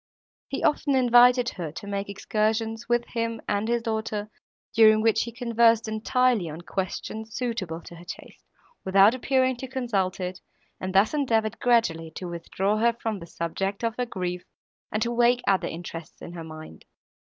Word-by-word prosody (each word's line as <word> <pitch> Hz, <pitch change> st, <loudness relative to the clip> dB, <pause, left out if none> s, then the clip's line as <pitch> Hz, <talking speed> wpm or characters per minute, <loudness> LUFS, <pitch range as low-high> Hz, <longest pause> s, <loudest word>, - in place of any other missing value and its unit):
He 275 Hz, -, -4 dB
often 295 Hz, -2 st, +2 dB
invited 245 Hz, -1 st, +5 dB
her 170 Hz, -5 st, -6 dB
to 200 Hz, -, -8 dB
make 200 Hz, 0 st, -3 dB
excursions, 220 Hz, +3 st, -1 dB
with 240 Hz, 0 st, +2 dB
him 230 Hz, -1 st, -2 dB
and 205 Hz, +1 st, 0 dB
his 235 Hz, 0 st, 0 dB
daughter, 220 Hz, -2 st, -3 dB, 0.4 s
during 215 Hz, -1 st, +6 dB
which 225 Hz, -1 st, +3 dB
he 235 Hz, -, -6 dB
conversed 230 Hz, -1 st, +3 dB
entirely 220 Hz, -2 st, +1 dB
on 155 Hz, +2 st, -7 dB
questions, 210 Hz, +4 st, -5 dB
suitable 200 Hz, -10 st, -3 dB
to 170 Hz, -, -11 dB
her 170 Hz, -, -12 dB
taste, 175 Hz, -, -10 dB, 0.4 s
without 195 Hz, +3 st, +5 dB
appearing 260 Hz, 0 st, +1 dB
to 265 Hz, -, -6 dB
consult 230 Hz, -9 st, -1 dB
it, 180 Hz, 0 st, -4 dB, 0.4 s
and 185 Hz, 0 st, -4 dB
thus 200 Hz, +7 st, +4 dB
endeavoured 225 Hz, -6 st, 0 dB
gradually 200 Hz, -10 st, +2 dB
to 180 Hz, -, -5 dB
withdraw 185 Hz, +4 st, -1 dB
her 235 Hz, +2 st, +3 dB
from 225 Hz, -3 st, -4 dB
the 170 Hz, -, -10 dB
subject 195 Hz, +6 st, -3 dB
of 230 Hz, -1 st, 0 dB
her 250 Hz, -, 0 dB
grief, 180 Hz, -4 st, -4 dB, 0.5 s
and 215 Hz, 0 st, 0 dB
to 235 Hz, -, -1 dB
awake 240 Hz, +1 st, +3 dB
other 195 Hz, -1 st, +2 dB
interests 165 Hz, 0 st, -8 dB
in 170 Hz, -, -9 dB
her 170 Hz, -2 st, -7 dB
mind. 155 Hz, -, -11 dB
220 Hz, 170 wpm, -26 LUFS, 185-235 Hz, 0.5 s, during